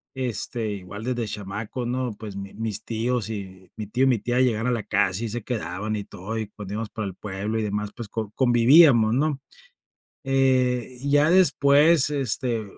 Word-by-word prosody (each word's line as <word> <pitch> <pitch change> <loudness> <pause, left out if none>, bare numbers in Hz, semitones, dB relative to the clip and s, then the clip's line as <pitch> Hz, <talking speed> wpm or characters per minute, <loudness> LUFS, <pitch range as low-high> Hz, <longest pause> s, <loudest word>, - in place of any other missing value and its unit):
este, 120 -3 -2
igual 100 +3 -9
desde 120 -2 -2
chamaco, 105 +4 -5
¿no? 125 -1 -2
Pues 105 -3 -8
mi 100 0 -7
mis 110 0 -3
tíos, 115 -1 -1
mi 95 0 -8
tío 125 +5 +1
y - - +3
mi 125 -4 +2
tía 120 +4 0
llegaban 115 -3 +1
a - - +1
la 115 -3 -2
casa 100 0 0
y 115 - -3
se 120 +1 -4
quedaban 105 -2 -3
y 105 - -3
todo, 105 +5 -6
y 110 - -2
pues 105 -1 -11
nos 100 - -6
íbamos 110 0 -4
para 110 -2 -5
el 95 - -7
pueblo 105 +3 -4
y - - -1
demás, 105 0 -3
pues, 120 -3 -7
co 110 -2 -5
convivíamos, 120 -1 +5
¿no? 145 +2 0 0.8
Eh, 130 -2 +1
y 140 - -1
ya 145 +2 +4
después, 150 -4 +5
este, 125 -4 0
115 Hz, 195 wpm, -24 LUFS, 105-130 Hz, 0.8 s, convivíamos